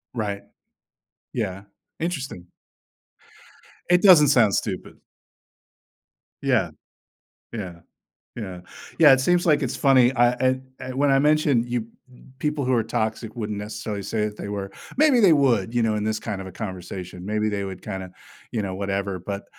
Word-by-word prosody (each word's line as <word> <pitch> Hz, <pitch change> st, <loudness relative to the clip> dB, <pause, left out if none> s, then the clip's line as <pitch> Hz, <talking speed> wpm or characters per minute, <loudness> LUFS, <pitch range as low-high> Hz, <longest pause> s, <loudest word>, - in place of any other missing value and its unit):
Right. 100 Hz, -3 st, -3 dB, 0.9 s
Yeah. 95 Hz, -5 st, -3 dB, 0.4 s
Interesting. 140 Hz, -, -4 dB, 1.4 s
It 180 Hz, 0 st, +5 dB
doesn't 165 Hz, -8 st, +8 dB
sound 115 Hz, -8 st, +4 dB
stupid. -, -, -3 dB, 1.5 s
Yeah. -, -, +1 dB, 0.8 s
Yeah. 95 Hz, -7 st, -6 dB, 0.6 s
Yeah. 95 Hz, -6 st, -6 dB, 0.4 s
Yeah, 150 Hz, -4 st, +8 dB
it 130 Hz, -, +4 dB
seems 175 Hz, +5 st, +2 dB
like 150 Hz, -3 st, +3 dB
it's 130 Hz, +1 st, -2 dB
funny. 130 Hz, -3 st, +5 dB
I 125 Hz, +2 st, +2 dB, 0.2 s
I 130 Hz, 0 st, -6 dB
when 140 Hz, +2 st, +2 dB
I 135 Hz, -, +4 dB
mentioned 150 Hz, -4 st, +3 dB
you 120 Hz, -2 st, -2 dB, 0.5 s
people 150 Hz, +1 st, -1 dB
who 130 Hz, -, +1 dB
are 115 Hz, -3 st, +3 dB
toxic 110 Hz, +1 st, -3 dB
wouldn't 105 Hz, -3 st, -3 dB
necessarily 105 Hz, 0 st, -5 dB
say 105 Hz, +2 st, -1 dB
that 105 Hz, 0 st, -5 dB
they 100 Hz, -, -6 dB
were. 100 Hz, -1 st, -4 dB, 0.3 s
Maybe 280 Hz, -4 st, +5 dB
they 180 Hz, -6 st, +6 dB
would, 120 Hz, -6 st, +2 dB
you 120 Hz, -, +2 dB
know, 110 Hz, -1 st, +1 dB
in 105 Hz, -, -2 dB
this 110 Hz, 0 st, -1 dB
kind 105 Hz, -4 st, -5 dB
of 95 Hz, -, -7 dB
a 95 Hz, -, -9 dB
conversation. 90 Hz, -3 st, -7 dB
Maybe 105 Hz, 0 st, 0 dB
they 100 Hz, -1 st, -2 dB
would 95 Hz, -1 st, -7 dB
kinda, 95 Hz, -1 st, -6 dB, 0.4 s
you 115 Hz, -, -2 dB
know, 95 Hz, -1 st, -4 dB
whatever. 100 Hz, -1 st, -2 dB
But, 100 Hz, +3 st, -5 dB
110 Hz, 155 wpm, -24 LUFS, 100-135 Hz, 1.5 s, doesn't